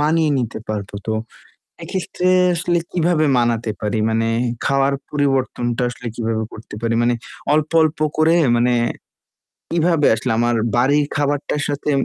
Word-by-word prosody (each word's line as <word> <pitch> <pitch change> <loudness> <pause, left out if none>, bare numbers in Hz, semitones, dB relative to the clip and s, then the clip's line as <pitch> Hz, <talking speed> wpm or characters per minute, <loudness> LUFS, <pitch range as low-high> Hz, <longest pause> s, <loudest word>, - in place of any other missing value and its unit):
মানিয়ে 155 +1 +2
নিতে 115 -3 -3
পারবো। 105 -2 -4
তো 110 - 0 0.7
এক্ষেত্রে 185 -1 -3 0.3
আসলে 175 0 0
কীভাবে 170 -2 +2
মানাতে 115 -2 +1
পারি? 105 +1 -1
মানে 115 0 +1 0.4
খাওয়ার 135 0 +2 0.2
পরিবর্তনটা 130 -4 0
আসলে 125 0 -8
কীভাবে 115 -1 -1
করতে 110 -1 -10
পারি, 115 0 0
মানে 120 +1 +2 0.4
অল্প, 155 0 +1
অল্প 155 -1 +1 0.2
করে 160 +1 +4 0.2
মানে 120 +1 +2 1.0
কীভাবে 165 -2 +2
আসলে 115 - -2
আমার 120 0 +2 0.2
বাড়ির 145 +4 +3
খাবারটার 145 0 -1
সাথে 145 +1 -3
135 Hz, 135 wpm, -20 LUFS, 115-155 Hz, 1.0 s, করে